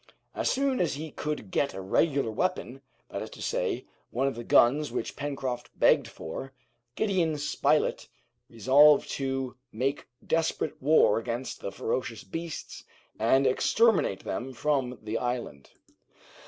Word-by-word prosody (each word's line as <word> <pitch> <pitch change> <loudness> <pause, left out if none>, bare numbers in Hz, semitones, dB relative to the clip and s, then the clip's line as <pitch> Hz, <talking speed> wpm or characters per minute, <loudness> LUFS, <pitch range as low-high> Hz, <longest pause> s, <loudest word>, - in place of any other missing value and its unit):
As - - 0
soon 270 -1 +1
as 170 -6 0
he 155 +1 -6
could 150 -12 -4
get 140 - 0
a - - -5
regular 135 - +1
weapon, 135 - -2 0.3
that - - -4
is - - -6
to - - -12
say, - - -1 0.2
one 130 +3 -1
of 135 - +1
the 120 - -7
guns 140 +6 +4
which - - -3
Pencroft 135 -4 -4
begged - - +4
for, 130 +12 -7 0.4
Gideon 180 -7 +1
Spilett 145 +1 +1 0.4
resolved 140 +6 +5
to 135 -2 -3
make 135 +6 -2 0.2
desperate 160 -1 -1
war 135 -6 +5
against 120 +2 -4
the 100 - -4
ferocious 115 +3 -3
beasts, 165 -2 -6 0.4
and 135 +1 +3
exterminate 215 - +3
them 130 +2 -4
from 130 -2 0
the 110 +1 -2
island. 120 - -4
135 Hz, 140 wpm, -28 LUFS, 120-150 Hz, 0.4 s, resolved